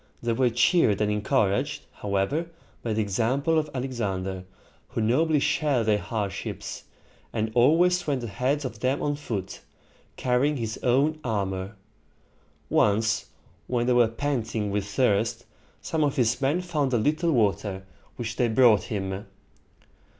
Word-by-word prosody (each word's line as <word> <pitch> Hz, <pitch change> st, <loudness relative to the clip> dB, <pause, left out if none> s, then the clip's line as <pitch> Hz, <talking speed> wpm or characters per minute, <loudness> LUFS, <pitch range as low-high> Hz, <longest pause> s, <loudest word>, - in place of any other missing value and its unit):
They 115 Hz, -1 st, +1 dB
were 125 Hz, +1 st, +2 dB
cheered 120 Hz, -, +3 dB
and 105 Hz, -1 st, +1 dB
encouraged, 130 Hz, +6 st, 0 dB
however, 105 Hz, +12 st, -1 dB, 0.3 s
by 115 Hz, -, -2 dB
the 110 Hz, 0 st, +1 dB
example 130 Hz, -, +1 dB
of 150 Hz, -1 st, -3 dB
Alexander, 100 Hz, -8 st, -3 dB, 0.4 s
who -, -, -4 dB
nobly 150 Hz, +8 st, +2 dB
shared 145 Hz, -4 st, +1 dB
their 105 Hz, -1 st, +3 dB
hardships, 105 Hz, -4 st, -4 dB, 0.5 s
and 110 Hz, -1 st, -2 dB
always 170 Hz, +9 st, +4 dB
went 135 Hz, -4 st, 0 dB
ahead 130 Hz, +7 st, -1 dB
of 130 Hz, -, -6 dB
them 130 Hz, +2 st, 0 dB
on 145 Hz, 0 st, 0 dB
foot, 100 Hz, -9 st, -5 dB, 0.6 s
carrying 130 Hz, +4 st, +1 dB
his 115 Hz, -2 st, -4 dB
own 140 Hz, +5 st, +2 dB
armor. 100 Hz, -3 st, -2 dB, 0.9 s
Once, 110 Hz, +2 st, +2 dB, 0.4 s
when 120 Hz, -1 st, 0 dB
they 125 Hz, -, +3 dB
were 120 Hz, -1 st, +5 dB
panting 115 Hz, -4 st, -2 dB
with 100 Hz, 0 st, -1 dB
thirst, 105 Hz, 0 st, +1 dB, 0.4 s
some 160 Hz, -1 st, 0 dB
of 145 Hz, -2 st, +1 dB
his 125 Hz, +1 st, +1 dB
men 145 Hz, +7 st, +1 dB
found 155 Hz, -7 st, -1 dB
a -, -, +4 dB
little 155 Hz, +8 st, +1 dB
water, 100 Hz, -5 st, 0 dB, 0.3 s
which 115 Hz, -1 st, -5 dB
they 120 Hz, -, +3 dB
brought 110 Hz, -4 st, +4 dB
him. 95 Hz, -1 st, -4 dB
120 Hz, 140 wpm, -26 LUFS, 105-140 Hz, 0.9 s, were